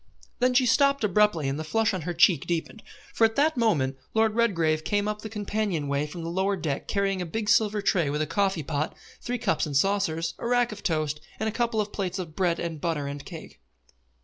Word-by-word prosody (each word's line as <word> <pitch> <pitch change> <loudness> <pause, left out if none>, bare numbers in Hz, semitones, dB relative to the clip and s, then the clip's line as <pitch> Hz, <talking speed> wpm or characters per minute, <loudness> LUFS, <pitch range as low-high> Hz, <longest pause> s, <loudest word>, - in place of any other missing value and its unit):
Then 250 0 +2
she 255 0 +5
stopped 275 +1 +3
abruptly 210 -7 +3
and 135 +2 -2
the - - -3
flush 220 +7 +1
on 185 - -2
her - - -1
cheek 170 -3 +4
deepened, 170 +5 -3 0.3
for - - +1
at 225 0 +4
that 310 +3 +3
moment 150 - +1 0.2
Lord 220 -1 +3
Redgrave 165 -9 +1
came 205 +2 0
up 210 0 -3
the 220 - -6
companion 205 -7 -2
way 140 +1 0
from 165 +3 -7
the 165 - -4
lower 190 +3 +1
deck 155 -7 -3
carrying 195 -2 0
a - - -1
big 215 +5 -3
silver 210 -1 +3
tray 175 -8 +2
with 150 +2 0
a - - -1
coffee 190 +1 0
pot, 150 +1 -2 0.3
three 245 +1 -2
cups 165 -8 0
and 145 -2 0
saucers, 165 -2 +1
a - - -3
rack 245 -1 +2
of 215 - -8
toast, 155 -3 -1 0.2
and 220 - -1
a - - 0
couple 235 0 0
of 210 -1 -2
plates 190 -2 -2
of 170 -4 -6
bread 175 -3 +1
and 165 -3 -4
butter 160 -4 -1
and 140 0 -6
cake. - - -10
190 Hz, 230 wpm, -26 LUFS, 160-220 Hz, 0.3 s, she